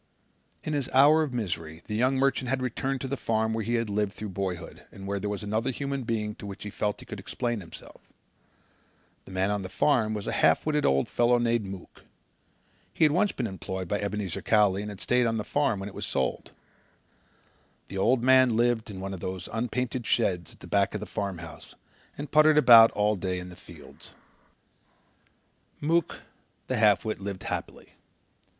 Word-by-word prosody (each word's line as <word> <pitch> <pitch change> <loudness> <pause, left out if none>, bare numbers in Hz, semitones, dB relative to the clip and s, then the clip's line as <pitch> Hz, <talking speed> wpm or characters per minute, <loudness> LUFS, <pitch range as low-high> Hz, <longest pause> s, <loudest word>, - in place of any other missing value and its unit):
In 155 - -3
his 140 -4 -2
hour 150 +4 +7
of 150 -4 -1
misery 85 -8 -4
the 105 - -6
young 125 +5 +2
merchant 135 -1 +1
had 135 0 0
returned 130 +2 -2
to 135 - -3
the 140 - -2
farm 110 -3 0
where 110 0 -2
he 120 +3 -1
had 115 -1 0
lived 105 -1 -1
through 105 -1 -6
boyhood 90 -2 -5
and 95 - -10
where 100 0 -2
there 105 +1 -3
was 105 0 -4
another 110 +3 -1
human 140 0 -3
being 110 -2 -2
to 100 - -8
whom 100 - -6
he 105 - -7
felt 105 +1 -2
he - - -12
could - - -8
explain 120 -3 -3
himself. 85 - -13 1.2
The - - -12
man 95 +2 0
on 105 -1 -1
the 95 - -6
farm 110 -2 +2
was 105 - -5
a - - -2
half 80 - +3
witted 150 -1 +1
old 70 0 +2
fellow 120 0 +3
named 120 -2 +1
Mook. 95 -2 -10 0.9
He 160 - +3
had 150 - +4
once 190 +5 +2
been 125 - -3
employed 95 -2 -5
by 105 +3 -1
Ebenezer 100 -3 -3
Cowley 105 -3 +3
and 105 - -5
had 100 -2 -9
stayed 125 -1 +2
on 115 0 0
the 105 - -2
farm 140 -4 0
when 95 - -5
it 100 - -9
was - - -5
sold. - - -2 1.4
The 95 - -5
old 120 +4 +2
man 130 -2 +5
lived 120 -2 +1
in 95 -2 -7
one 95 0 -4
of 95 - -6
the 95 0 -5
unpainted 120 +1 -2
sheds 90 -8 0
back 100 +1 0
of - - -2
the 105 - -6
farmhouse 85 -7 -6 0.4
and 145 -1 -6
puttered 155 0 +5
about 115 -6 +9
all 105 +1 +2
day 95 -1 -3
in 90 0 -7
the 90 - -11
fields. - - -13 1.6
Mook 165 +2 0 0.4
the - - -2
half 105 -1 +4
wit 110 -4 -3
lived 100 -1 -5
happily. - - -6
110 Hz, 195 wpm, -27 LUFS, 95-125 Hz, 1.6 s, about